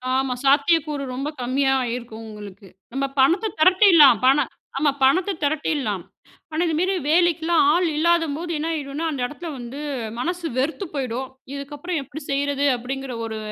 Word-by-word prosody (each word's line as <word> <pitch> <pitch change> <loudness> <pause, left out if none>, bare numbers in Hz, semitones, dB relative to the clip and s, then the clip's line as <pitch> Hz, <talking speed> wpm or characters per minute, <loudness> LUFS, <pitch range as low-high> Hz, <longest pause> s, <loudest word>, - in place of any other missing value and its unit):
ஆமா. 265 -1 0
சாத்தியக்கூறு 290 +1 +2
ரொம்ப 275 +3 -3
கம்மியாயிருக்கும் 245 -3 -1
உங்களுக்கு. 205 -2 -11 0.3
நம்ம 275 +1 0
பணத்த 355 +11 +3
திரட்டிர்லாம். 335 - +7
பண 270 +3 +4 0.3
ஆமா. 290 +1 +2
பணத்த 360 +9 +3
திரட்டிர்லாம். 285 - -1 0.5
ஆனா, 315 - 0
இதுமேரி 360 +5 0
வேலைக்கெல்லாம் 340 -1 +3
ஆள் 355 +2 +2
இல்லாதம்போது 335 0 +1
என்ன 310 +2 -3
ஆயிடுன்னா, 295 +1 -4
அந்த 275 -4 -4
இடத்துல 310 +6 -7
வந்து 245 +3 -8 0.4
மனசு 350 +5 -3
வெறுத்து 320 +9 -1
போயிடும். 260 -1 -3 0.2
இதுக்கப்பறம் 290 +4 -4
எப்பிடி 295 +3 -9
செய்யிறது? 285 0 0
அப்பிடிங்கிற 260 +1 -5
ஒரு 220 -1 -5
285 Hz, 135 wpm, -22 LUFS, 265-330 Hz, 0.5 s, திரட்டிர்லாம்